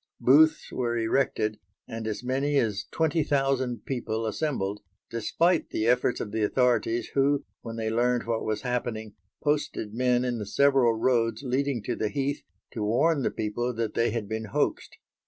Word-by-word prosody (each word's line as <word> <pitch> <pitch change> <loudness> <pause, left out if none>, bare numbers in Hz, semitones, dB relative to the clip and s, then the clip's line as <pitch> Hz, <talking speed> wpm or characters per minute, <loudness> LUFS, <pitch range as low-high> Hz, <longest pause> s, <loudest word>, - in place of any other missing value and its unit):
Booths 155 +4 +4
were 120 -2 -1
erected 110 -2 0 0.3
and 115 -1 -5
as 110 +2 -3
many 135 +3 0
as 105 -5 0
twenty 160 0 +1
thousand 135 -5 0
people 115 -4 -2
assembled, 110 -6 -2 0.3
despite 165 - +1
the 110 - -1
efforts 125 +1 +2
of 105 - -4
the 110 +1 -1
authorities 120 0 +1
who, 140 +1 +2 0.2
when 115 -1 -7
they 110 -1 -2
learned 120 +1 +1
what 115 -1 -1
was 110 +2 -2
happening, 120 -4 -3 0.3
posted 145 -8 -1
men 125 +1 +2
in 120 -2 -1
the 105 - -4
several 135 -1 +4
roads 115 0 +1
leading 130 -2 -1
to 120 - -2
the 110 - -1
heath 140 +3 -2 0.3
to 110 - -5
warn 140 +9 +2
the - - +1
people 115 +3 -2
that 115 -2 -2
they 115 - +2
had 110 -2 -3
been 110 +1 -3
hoaxed. 105 - -2
120 Hz, 170 wpm, -27 LUFS, 110-135 Hz, 0.3 s, Booths